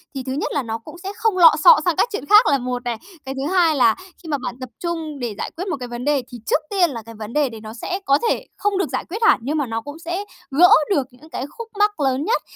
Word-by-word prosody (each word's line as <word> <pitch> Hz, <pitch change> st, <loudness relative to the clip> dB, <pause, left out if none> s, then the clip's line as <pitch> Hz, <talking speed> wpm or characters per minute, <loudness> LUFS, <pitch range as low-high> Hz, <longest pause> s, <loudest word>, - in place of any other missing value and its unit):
Thì 265 Hz, -, -4 dB
thứ 260 Hz, -, -5 dB
nhất 285 Hz, -, -2 dB
là 285 Hz, -, 0 dB
nó 225 Hz, -1 st, -3 dB
cũng 230 Hz, +9 st, -12 dB
sẽ 390 Hz, -, -4 dB
không 435 Hz, -5 st, +1 dB
lọ 330 Hz, -3 st, +9 dB
xọ -, -, +9 dB
sang 350 Hz, -3 st, +2 dB
các 475 Hz, -, +2 dB
chuyện 405 Hz, -, -4 dB
khác 420 Hz, +7 st, +7 dB
là 280 Hz, -, +4 dB
một 250 Hz, -1 st, -4 dB
này. 240 Hz, -2 st, -2 dB, 0.3 s
Cái 270 Hz, 0 st, -5 dB
thứ 280 Hz, +7 st, -2 dB
hai 340 Hz, -4 st, +4 dB
là 235 Hz, -5 st, +4 dB, 0.3 s
khi 325 Hz, -, -9 dB
mà 290 Hz, -, 0 dB
bạn 250 Hz, -2 st, -5 dB
tập 255 Hz, -1 st, -7 dB
trung 325 Hz, -4 st, -4 dB
để 235 Hz, -4 st, -4 dB
giải -, -, -4 dB
quyết 370 Hz, +4 st, -4 dB
một 350 Hz, -, -2 dB
cái 245 Hz, -, -5 dB
vấn 240 Hz, +2 st, -6 dB
đề 290 Hz, -2 st, +2 dB
thì 245 Hz, -, -7 dB
trước -, -, +2 dB
tiên 375 Hz, -4 st, +3 dB
là 235 Hz, -5 st, -6 dB
cái 230 Hz, -, -11 dB
vấn 215 Hz, +1 st, -8 dB
đề 295 Hz, -3 st, +2 dB
đấy 225 Hz, -2 st, -10 dB
nó 215 Hz, 0 st, -8 dB
sẽ 360 Hz, -, -4 dB
có 275 Hz, +1 st, +4 dB
thể -, -, -1 dB
không 410 Hz, -1 st, 0 dB
được 385 Hz, -5 st, 0 dB
giải -, -, -3 dB
quyết 425 Hz, +6 st, -4 dB
hẳn 440 Hz, -, +5 dB
nhưng 295 Hz, +4 st, -1 dB
mà 290 Hz, -, 0 dB
nó 225 Hz, 0 st, -3 dB
cũng 290 Hz, +5 st, -9 dB
sẽ 345 Hz, +4 st, -3 dB, 0.3 s
gỡ 345 Hz, +6 st, +6 dB, 0.2 s
được 280 Hz, -9 st, +1 dB
những 265 Hz, +6 st, -18 dB
cái 265 Hz, -, -4 dB
khúc 465 Hz, -1 st, -6 dB
mắc 415 Hz, -4 st, +2 dB
lớn 270 Hz, +1 st, 0 dB
nhất. 460 Hz, -, +1 dB
290 Hz, 300 wpm, -21 LUFS, 250-355 Hz, 0.3 s, lọ